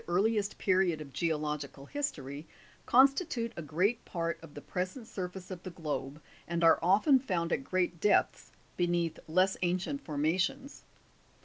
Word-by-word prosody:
earliest 205 +3 +1
period 185 -4 +2
of 145 -3 -9
geological 150 -4 -2
history, 150 - -4 0.4
constitute 265 -2 +4
a - - -5
great 180 +10 0
part 165 -2 -3
of 165 -3 -13
the 145 - -7
present 185 - -4
surface 185 -2 -6
of 180 -2 -6
the 185 - -7
globe, 150 -4 -4 0.3
and 170 0 -1
are 165 - +6
often 210 - +5
found 175 -9 -1
at - - -1
great 180 -6 -1
depths, 210 - +2 0.3
beneath 175 -2 0
less 185 +4 +2
ancient 185 +11 -1
formations. 170 - -1
180 Hz, 140 wpm, -31 LUFS, 160-200 Hz, 0.4 s, are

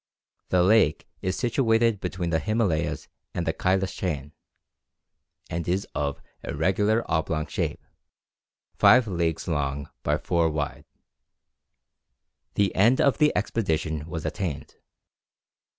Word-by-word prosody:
The 90 -1 +4
lake 95 -6 +3
is 95 0 -1
situated 115 -3 +2
between 90 -2 -3
the 80 - +2
Himalayas 105 -7 0 0.3
and 85 - -1
the 80 - 0
Cailas 95 +1 0
chain, 75 -6 -3 1.2
and 85 0 -4
is 95 +3 0
of 70 -1 -2 0.2
irregular 105 +9 +1
oblong 80 -1 0
shape, - - -3 0.9
five 115 +5 +6
leagues 85 -4 -1
long 70 -3 -2
by 75 +1 +1
four 85 0 +1
wide. 75 -3 -3 1.7
The 100 -2 +2
end 115 +7 +4
of 140 - +3
the 150 -1 +5
expedition 80 -8 -1
was 80 -2 -5
attained. 95 -9 -4
90 Hz, 115 wpm, -26 LUFS, 80-105 Hz, 1.7 s, five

